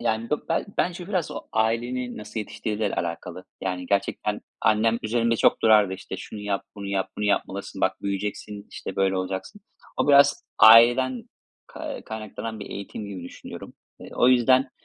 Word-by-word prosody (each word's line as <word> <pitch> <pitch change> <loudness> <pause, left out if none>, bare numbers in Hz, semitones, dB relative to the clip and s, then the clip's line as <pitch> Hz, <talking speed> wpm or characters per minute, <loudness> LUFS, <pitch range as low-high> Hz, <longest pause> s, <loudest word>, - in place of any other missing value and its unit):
yani 115 -1 -1
be 150 - +4 0.4
bence 180 0 -1
biraz 185 -6 -1
o - - -5
ailenin 120 +3 -1
nasıl 105 +1 -5
yetiştirdiğiyle 105 0 -3
alakalı. 85 +1 -4 0.2
Yani, 90 -1 -3
gerçekten 100 +2 -1 0.2
annem 115 +1 +3
üzerimde 115 +1 +1
çok - - +3
dururdu. 105 -3 +5
İşte, 95 - -7
şunu 105 - -8
yap, 100 -1 -2
bunu 100 -1 -6
yap, 100 -1 -1
bunu 105 - -2
yapmalısın, 100 -1 -2
bak - - 0
büyüyeceksin, 100 +1 -4
işte, - - -7
böyle 95 -1 +2
olacaksın. 95 - -4 0.4
O - - 0
biraz 140 0 +5
aileden 120 +3 +7 0.4
kay - - -7
kaynaklanan 110 0 -6
bir 100 - -8
eğitim 100 +1 -6
gibi 95 -3 -7
düşünüyorum. 90 - -10 0.3
Eee, - - -10
o 125 - +4
yüzden, 130 +1 +4
110 Hz, 160 wpm, -25 LUFS, 100-120 Hz, 0.4 s, aileden